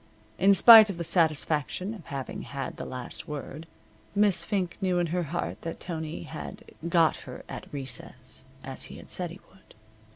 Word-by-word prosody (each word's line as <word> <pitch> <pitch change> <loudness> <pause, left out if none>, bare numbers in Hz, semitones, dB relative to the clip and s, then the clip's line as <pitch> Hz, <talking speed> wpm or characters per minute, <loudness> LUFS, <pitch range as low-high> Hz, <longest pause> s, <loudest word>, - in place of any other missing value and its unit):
In 200 +1 +6
spite 220 +1 +10
of 190 - -4
the 170 - -3
satisfaction 165 +3 +1
of 195 -7 -11
having 135 -2 -5
had 140 -1 -6
the - - -6
last 130 +5 -6
word, 150 +1 -7 0.5
Miss 205 -2 +4
Fink 190 -5 -2
knew 185 -2 +1
in 175 - +2
her 180 - +1
heart 90 - -4
that 165 - -5
Tony 160 -2 -5
had 155 -1 -8 0.3
"got 165 -3 +4
her - - -10
at - - -8
recess," 130 -4 -6 0.2
as - - -4
he - - -10
had - - -11
said 180 -2 -1
he 175 +4 -11
would. 190 - -21
165 Hz, 175 wpm, -28 LUFS, 150-185 Hz, 0.5 s, spite